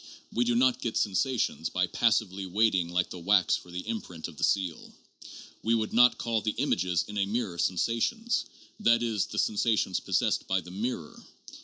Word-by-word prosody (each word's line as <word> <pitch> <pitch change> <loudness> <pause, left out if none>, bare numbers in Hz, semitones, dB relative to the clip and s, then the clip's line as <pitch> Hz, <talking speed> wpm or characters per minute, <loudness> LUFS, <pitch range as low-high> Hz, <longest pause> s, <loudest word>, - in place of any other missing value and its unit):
We 120 +1 +1
do 120 0 +1
not 125 +1 +3
get 115 - -2
sensations 105 -3 0
by 90 0 +1
passively 100 -1 0
waiting 95 -3 +2
like 90 +1 0
the 90 - -7
wax 95 +2 +3
for - - -9
the 90 +1 -6
imprint 90 -7 -5
of 85 - -12
the - - -5
seal. 95 -5 0 0.7
"We 115 +1 +2
would 110 -1 -2
not 125 +2 +6
call 115 -2 -1
the 110 - -2
images 90 - 0
in 105 0 -4
a 100 - +1
mirror 105 -5 -2
sensations 115 - 0 0.3
(that 115 0 +3
is, 110 -4 0
the 105 - -7
sensations 105 -3 +1
possessed - - 0
by 95 0 +1
the 90 - -12
mirror). 100 -5 -5
105 Hz, 180 wpm, -28 LUFS, 90-115 Hz, 0.7 s, not